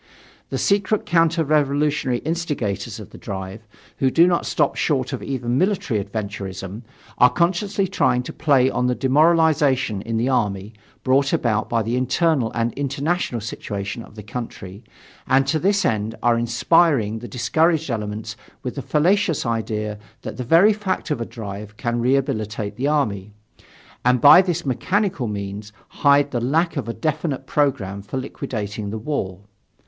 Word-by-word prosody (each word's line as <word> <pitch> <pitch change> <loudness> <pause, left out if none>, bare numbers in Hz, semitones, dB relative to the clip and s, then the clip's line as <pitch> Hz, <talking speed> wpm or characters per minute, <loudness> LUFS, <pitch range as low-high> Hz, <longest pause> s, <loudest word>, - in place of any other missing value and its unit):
"The - - -2
secret 200 +1 +1
counter 165 -1 +2
revolutionary 145 -3 +1
instigators 150 - -2
of - - -11
the - - -12
drive, 95 +3 -7 0.3
who 135 - +2
do 165 +6 +5
not 175 -1 +1
stop 150 -3 +1
short 135 -3 0
even 125 -2 -3
of 125 - +2
military 175 - 0
adventurism, 100 -1 -6 0.4
are 125 - +7
consciously 190 +5 0
trying 130 -9 +1
to - - -7
play 140 -5 +3
on 125 -1 0
the 125 - +1
demoralization 145 - +3
in 115 +2 -3
the 120 +3 +1
army, 105 -5 -1 0.3
brought 135 +1 +2
about 110 -3 0
by 115 -1 +1
the 115 +3 -1
internal 130 -1 +1
and 115 0 -1
international 140 -1 -2
situation 100 0 -5
of 110 - -14
the 105 - -9
country, 100 -2 -7 0.4
and 135 +1 +4
to 155 +4 0
this 200 +4 +2
end 110 0 -1
are 120 -1 +4
inspiring 120 -1 +2
the 120 - -8
discouraged 160 +4 +1
elements 110 0 -4 0.3
with 125 - -3
the 140 - -5
fallacious 165 - +1
idea 105 -2 -2 0.2
that - - -6
the 125 - -3
very 170 - +5
fact 195 -5 -3
of 135 -5 -1
a - - -2
drive 105 -1 -8
can 120 0 -1
rehabilitate 110 -5 -1
the 130 +5 -1
army 105 -9 -1 0.7
and 125 0 +3
by 145 +8 +9
this 175 -3 -2
mechanical 180 - 0
means 100 0 -5 0.2
hide 140 0 +3
the 120 - -1
lack 160 +8 +1
of 130 -6 -3
a - - -2
definite 155 -3 -2
program 110 -10 0
for 100 +6 -6
liquidating 110 -6 -5
the 110 - -4
war. 105 -7 -3
130 Hz, 160 wpm, -22 LUFS, 110-155 Hz, 0.7 s, by